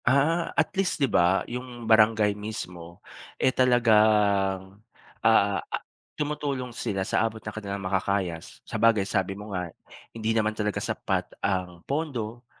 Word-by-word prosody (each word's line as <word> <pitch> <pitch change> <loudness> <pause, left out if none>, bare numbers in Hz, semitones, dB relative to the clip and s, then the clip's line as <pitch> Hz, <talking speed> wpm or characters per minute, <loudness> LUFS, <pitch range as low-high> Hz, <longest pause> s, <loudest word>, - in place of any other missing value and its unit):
Ah, 145 +7 +3
at - - +2
least 195 -1 0
'di 140 - +3
ba 90 -6 +3
'yung 125 -1 -7
barangay 110 -1 +4
mismo, 90 -5 -8 0.3
eh, 130 - +2
talagang, 105 -5 +3 0.4
ah, - - +4 0.6
tumutulong 145 -4 -3
sila 100 -5 -2
sa - - +1
abot 110 0 -3
ng 105 - -6
kanilang 100 -2 -4
makakaya 95 -2 0
s - - -15
sabagay 115 -2 +3
sabi 95 -1 0
mo 105 +1 -8
nga 90 -2 -4 0.4
hindi 115 0 -1
naman 110 0 +1
talaga 105 -1 -2
sapat - - -1 0.2
ang 90 -3 -2
pondo 125 -6 -3
110 Hz, 140 wpm, -26 LUFS, 95-125 Hz, 0.6 s, barangay